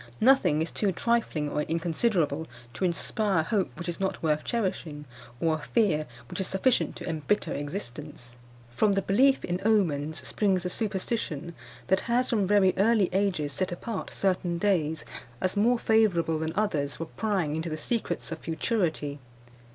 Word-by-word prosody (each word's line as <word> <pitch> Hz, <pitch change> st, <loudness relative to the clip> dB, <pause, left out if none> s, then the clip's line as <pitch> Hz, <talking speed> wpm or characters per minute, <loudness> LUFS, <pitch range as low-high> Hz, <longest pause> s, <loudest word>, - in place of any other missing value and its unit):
Nothing 230 Hz, -, +4 dB
is 165 Hz, -, -5 dB
too 205 Hz, -2 st, 0 dB
trifling 220 Hz, -8 st, 0 dB
or 150 Hz, -, -1 dB
inconsiderable 165 Hz, -1 st, 0 dB, 0.3 s
to 190 Hz, -, -1 dB
inspire 190 Hz, +1 st, +1 dB
a -, -, -3 dB
hope 195 Hz, +3 st, 0 dB
which 175 Hz, -, -6 dB
is 175 Hz, -, -3 dB
not 190 Hz, -3 st, -2 dB
worth 155 Hz, -1 st, +1 dB
cherishing, 175 Hz, -10 st, -2 dB, 0.3 s
or 165 Hz, -1 st, +2 dB
a 155 Hz, -, -2 dB
fear 155 Hz, -4 st, +1 dB, 0.2 s
which -, -, -6 dB
is 190 Hz, -, 0 dB
sufficient 210 Hz, +6 st, +1 dB
to -, -, -7 dB
embitter 165 Hz, +5 st, -1 dB
existence. 145 Hz, -5 st, -6 dB, 0.4 s
From 200 Hz, -, +2 dB
the 195 Hz, 0 st, 0 dB
belief 265 Hz, +7 st, +3 dB
in 175 Hz, +1 st, -2 dB
omens 160 Hz, -9 st, +1 dB
springs 190 Hz, -4 st, +1 dB
the 180 Hz, -, -2 dB
superstition 190 Hz, -6 st, -2 dB, 0.3 s
that 190 Hz, 0 st, +2 dB
has, 245 Hz, +2 st, +2 dB
from 205 Hz, -5 st, +2 dB
very 195 Hz, -2 st, +4 dB
early 205 Hz, -2 st, +3 dB
ages, 180 Hz, -7 st, 0 dB
set 185 Hz, +7 st, -1 dB
apart 190 Hz, +3 st, -5 dB
certain 180 Hz, -3 st, 0 dB
days, 170 Hz, -5 st, +1 dB, 0.3 s
as 185 Hz, +2 st, 0 dB
more 235 Hz, +4 st, +3 dB
favourable 180 Hz, -9 st, +2 dB
than 160 Hz, 0 st, -2 dB
others, 155 Hz, -9 st, 0 dB
for 165 Hz, -, -4 dB
prying 185 Hz, -6 st, -1 dB
into 160 Hz, +1 st, -3 dB
the 155 Hz, -, -3 dB
secrets 175 Hz, 0 st, -3 dB
of 165 Hz, -, -4 dB
futurity. 160 Hz, -, -1 dB
180 Hz, 165 wpm, -28 LUFS, 155-210 Hz, 0.4 s, Nothing